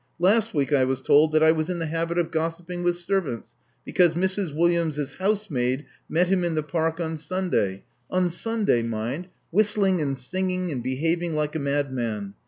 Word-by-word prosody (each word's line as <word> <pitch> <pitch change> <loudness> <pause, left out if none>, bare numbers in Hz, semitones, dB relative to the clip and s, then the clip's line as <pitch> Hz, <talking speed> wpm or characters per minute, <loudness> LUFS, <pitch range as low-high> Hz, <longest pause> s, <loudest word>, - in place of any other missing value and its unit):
Last 210 +4 +2
week 145 0 +1
I 135 -2 +5
was 130 0 0
told 155 +2 +4
that 155 0 +4
I 160 - +7
was 160 +1 -1
in 180 - -1
the 165 - -2
habit 165 +2 -2
of 170 -1 0
gossiping 165 +2 -3
with 175 0 +1
servants, 175 - -2 0.3
because 175 -3 +3
Mrs. 190 0 0
Williams' 160 -3 +1
housemaid 150 -10 0 0.2
met 175 +3 +3
him 185 -1 +2
in 170 -2 0
the 155 - 0
Park 165 +1 -1
on 160 -2 -3
Sunday 150 - -1
— - - -43
on 180 -1 +1
Sunday, 210 - +1
mind 115 +9 -3
— - - -44
whistling 195 -2 +2
and 140 -2 -1
sing 185 +9 -2
ing 180 -1 -2
and 130 -4 -3
behaving 165 +6 -1
like 150 0 -1
a - - 0
madman. 130 -8 -2
165 Hz, 190 wpm, -25 LUFS, 145-180 Hz, 0.3 s, I